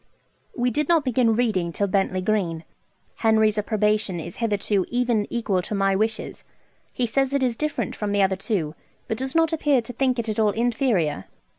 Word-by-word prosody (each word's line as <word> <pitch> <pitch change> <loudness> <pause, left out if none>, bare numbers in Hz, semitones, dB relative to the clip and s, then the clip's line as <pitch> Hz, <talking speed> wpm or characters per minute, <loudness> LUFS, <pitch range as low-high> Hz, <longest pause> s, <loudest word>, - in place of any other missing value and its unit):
We 245 0 +1
did 300 +5 -1
not 330 -4 +3
begin 240 -3 +2
reading 210 -8 0
till 200 - -1
Bentley 195 -1 0
Green. 185 -5 -1 0.5
Henry's 220 -1 +3
approbation 210 -3 0
is 170 +2 -7
hitherto 205 -3 0
even 240 -4 +1
equal 215 -6 0
to 210 - -4
my 195 -1 +2
wishes. 220 +2 -2 0.5
He 250 - 0
says 270 +4 0
it 275 - +1
is 245 -2 +1
different 305 +4 -2
from 210 -1 -3
the 200 -1 +3
other 190 0 +2
two, 185 -6 -2 0.3
but 220 - -3
does 265 +2 -4
not 325 -1 +3
appear 295 -4 +2
to 245 - -7
think 255 +1 +1
it 235 -1 -2
at 215 0 -2
all 210 -2 +3
inferior. 225 - 0
220 Hz, 185 wpm, -24 LUFS, 195-245 Hz, 0.5 s, not